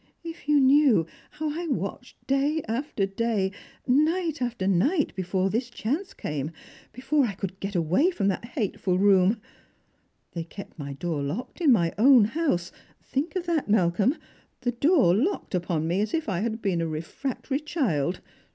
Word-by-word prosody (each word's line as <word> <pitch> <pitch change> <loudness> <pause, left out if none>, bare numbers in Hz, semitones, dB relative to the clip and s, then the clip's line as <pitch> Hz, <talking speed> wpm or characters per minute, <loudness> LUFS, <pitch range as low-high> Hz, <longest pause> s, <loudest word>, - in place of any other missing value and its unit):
If 330 -3 -9
you 295 -1 +5
knew 265 - +5 0.2
how 305 0 -3
I 335 +3 -4
watched 250 -2 -4
day 280 +4 +1
after 230 -3 -1
day, 195 -1 -1 0.3
night 310 +3 +1
after 240 -6 -2
night, 270 - +2
before 190 +1 0
this 240 +3 -1
chance 280 - -3
came, 150 -1 -3 0.4
before 270 +3 +1
I 210 - -3
could 190 0 -6
get 195 0 -5
away 175 - +3
from 210 - -1
that 190 - -2
hateful 205 - -1
room! 195 +2 +4 0.9
They 170 - -4
kept 180 +1 -11
iny 140 -1 -6
door 160 -2 -2
locked 175 - -5
in 305 -5 +5
my 170 -8 +3
own 250 -2 +7
house 215 - -1 0.2
— - - -33
think 290 +8 -1
of 365 -2 -2
that, 330 -9 -1
Malcolm 205 - +2 0.2
— - - -37
the 245 -1 0
door 270 - +4
locked 305 - -1
upon 170 -3 -1
me 180 +4 +1
as 215 +5 -1
if 320 - -2
I 190 -5 -1
had 225 +2 -3
been 185 -5 +1
a 165 - -1
re 155 -1 -3
fractory 270 - -4
child 195 - -1
225 Hz, 175 wpm, -26 LUFS, 185-290 Hz, 0.9 s, own